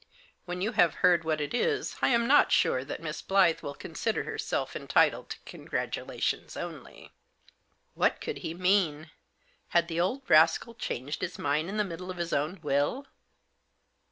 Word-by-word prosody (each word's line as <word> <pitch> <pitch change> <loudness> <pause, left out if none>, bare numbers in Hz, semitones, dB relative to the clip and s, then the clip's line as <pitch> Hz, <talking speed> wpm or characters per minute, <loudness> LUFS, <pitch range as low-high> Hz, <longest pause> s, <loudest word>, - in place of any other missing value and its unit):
When 180 0 -5
you 215 +4 0
have 175 -8 +3
heard 175 -2 +5
what 160 -1 0
it 145 - -3
is 430 - 0
I - - +4
am 235 -2 +3
not 290 +3 +5
sure 130 - +3
that 145 - -7
Miss 155 -1 -4
Blyth 190 -4 +3
will 140 - -6
consider - - -2
herself - - -3
entitled - - +2
to - - -6
congra - - -4
tulations - - -3
only." - - -9 0.8
What - - +1
could - - -5
he 160 - -5
mean? 175 -4 +1 0.6
Had 170 -1 +2
the 165 0 -3
old 250 +9 -1
rascal 165 +8 +4
changed 145 - -4
his 180 - -4
mind 150 +4 0
in 210 - -4
the 210 - +3
middle 180 -1 -7
of 185 - -5
his 170 -1 -3
own 155 +7 -1
will 145 - 0
170 Hz, 170 wpm, -29 LUFS, 155-195 Hz, 0.8 s, heard